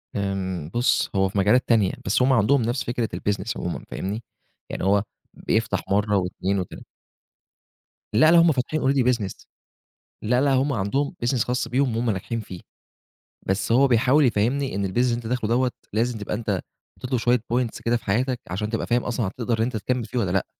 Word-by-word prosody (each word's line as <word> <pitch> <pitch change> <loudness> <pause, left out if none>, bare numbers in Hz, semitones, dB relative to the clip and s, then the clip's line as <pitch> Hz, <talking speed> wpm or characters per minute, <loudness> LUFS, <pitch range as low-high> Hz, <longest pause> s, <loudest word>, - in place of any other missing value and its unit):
آمم 95 -5 -2
بُص، 120 +2 +2
هو 95 0 +2
في 100 - -5
مجالات 105 +6 +3
تانية، 110 -5 +4
بس 100 +6 +1
هم 130 +1 +4
عندهم 125 +4 +3
نفس 120 +3 -1
فكرة 120 -2 -2
الbusiness 105 +2 -2
عمومًا 90 - -4
فاهمني، 105 +5 -4 0.5
يعني - - -4
هو 100 +1 +3 0.3
بيفتح 110 0 -1
مرّة 105 +1 +2
و2 95 +1 -1
و3. 90 - -7 1.3
لأ، 155 +9 +6
لأ، 170 - +7
هم 165 0 +5
فاتحين 145 +3 -1
already 135 -2 +2
business. 105 -6 -5 0.8
لأ، 125 +3 +2
لأ، 140 0 +3
هم 135 +2 +2
عندهم 135 - -1
business 125 +2 +1
خاص 125 +1 -1
بيهم 130 -2 +1
وهُم 115 0 0
ناجحين 110 +4 -3
فيه. 95 -5 -9 0.9
بس 95 +4 0
هو 135 +4 +5
بيحاول 130 +5 +4
يفهِّمني 125 +3 0
إن 100 -1 -1
الbusiness 95 - -6
اللي 125 0 +3
أنت 120 -1 -6
داخله 115 -2 -1
دوّة 125 +1 +2 0.2
لازم 115 +2 0
تبقى 105 - -4
أنت 105 -4 -2 0.4
حطّيت 125 - -8
له 130 - +2
شوية 120 +2 +2
points 120 -2 -1
كده 120 +1 +2
في - - -16
حياتك، 125 +5 0
عشان 100 +4 -3
تبقى 115 0 -2
فاهم 120 0 +1
أصلًا 120 -3 -1
هتقدر 115 +3 -2
إن 110 - +1
أنت 120 -1 -2
تكمِّل 120 +3 -2
فيه 125 - -3
والّا 95 -6 0
لأ، 95 - +1
115 Hz, 195 wpm, -24 LUFS, 100-125 Hz, 1.3 s, لأ